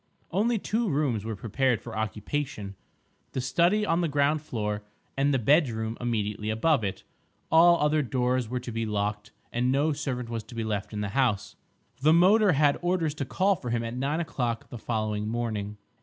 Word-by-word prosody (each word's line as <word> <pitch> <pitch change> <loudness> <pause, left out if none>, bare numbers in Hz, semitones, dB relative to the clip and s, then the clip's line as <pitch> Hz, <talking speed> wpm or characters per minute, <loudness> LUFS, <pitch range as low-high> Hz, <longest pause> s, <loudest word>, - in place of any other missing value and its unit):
Only 220 +6 +2
two 220 +2 -1
rooms 140 - 0
were 110 -1 -3
prepared 120 +4 0
for 115 - -9
occupation: 110 +1 -3 0.6
the - - -2
study 175 +11 +2
on 170 -3 +1
the 170 - +1
ground 145 +1 +1
floor 105 -7 -3 0.3
and 140 +1 +2
the 135 - +3
bedroom 115 -4 +2
immediately 105 -3 -2
above 115 +4 +2
it; 95 -2 -3 0.5
all 170 +1 +6
other 150 +1 +2
doors 125 -2 0
were 125 +1 -2
to 120 - -6
be 115 0 -2
locked, 105 0 -2 0.2
and 125 +2 +1
no 145 +3 +2
servant 130 -4 -3
was 115 -1 -3
to 120 - -12
be 115 - -2
left 105 -2 -3
in 105 -1 -4
the 105 - -2
house. 115 -3 0 0.5
The 155 +3 +5
motor 195 +3 +5
had 145 0 +3
orders 175 -4 0
to 145 -2 -4
call 195 +8 +2
for 125 - -6
him 115 0 0
at 115 +1 -4
nine 140 +5 -1
o'clock 125 -8 -2
the 120 - -7
following 105 -2 -2
morning. 110 -3 -3
125 Hz, 185 wpm, -27 LUFS, 110-150 Hz, 0.6 s, all